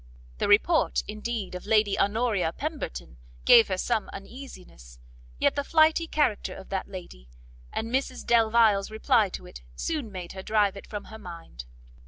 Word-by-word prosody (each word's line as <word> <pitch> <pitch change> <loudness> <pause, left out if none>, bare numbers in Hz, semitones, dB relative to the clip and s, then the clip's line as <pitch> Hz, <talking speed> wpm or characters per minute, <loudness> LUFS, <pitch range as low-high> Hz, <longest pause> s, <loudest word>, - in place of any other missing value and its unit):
The - - +1
report, 225 +11 +3
indeed, 215 -1 -4
of 180 +2 -7
Lady 215 -2 +3
Honoria 205 -5 +1
Pemberton 280 - -5 0.3
gave 230 -2 +8
her 190 -3 -2
some 220 +3 -1
uneasiness, 195 - -11 0.4
yet - - +2
the 285 - -1
flighty 320 +2 +3
character 295 -10 0
of - - -11
that 190 -1 -3
lady, 175 - -10 0.4
and 225 +1 -4
Mrs 260 0 -2
Delvile's 225 -3 +4
reply 220 -1 +2
to - - -8
it, - - -11
soon 270 - -3
made 180 -3 -7
her 190 - -7
drive 205 -1 +1
it 200 - -10
from 210 -2 -6
her 220 - -11
mind. 165 - -10
210 Hz, 160 wpm, -27 LUFS, 185-235 Hz, 0.4 s, gave